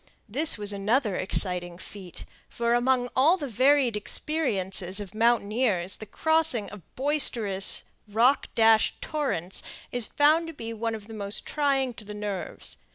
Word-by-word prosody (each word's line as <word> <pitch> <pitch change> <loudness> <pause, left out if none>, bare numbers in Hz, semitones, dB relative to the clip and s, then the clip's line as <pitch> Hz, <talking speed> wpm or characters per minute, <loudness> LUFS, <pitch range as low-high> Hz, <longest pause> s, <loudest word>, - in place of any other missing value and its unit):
This 285 +8 +1
was 205 -1 +1
another 210 +2 0
exciting 180 -2 +1
feat; 185 -1 -10 0.2
for, 235 0 -1
among 245 +1 +1
all 310 +8 +4
the 295 -5 -5
varied 260 0 +2
experiences 195 - -1
of 200 -2 -8
mountaineers, 215 -4 +1
the 215 - -9
crossing 315 -9 +1
of 210 -2 -10
boisterous, 235 -9 +2 0.2
rock 235 +7 +2
dashed 225 -1 +3
torrents 230 - -3 0.3
is 245 -3 -3
found 310 +3 +2
to 325 - -7
be 230 -5 -7
one 225 0 -3
of 210 -2 -10
the 225 - -11
most 205 -1 -2
trying 275 -4 0
to 225 - -11
the 210 0 -9
nerves. 205 -2 -5
225 Hz, 150 wpm, -26 LUFS, 200-270 Hz, 0.3 s, all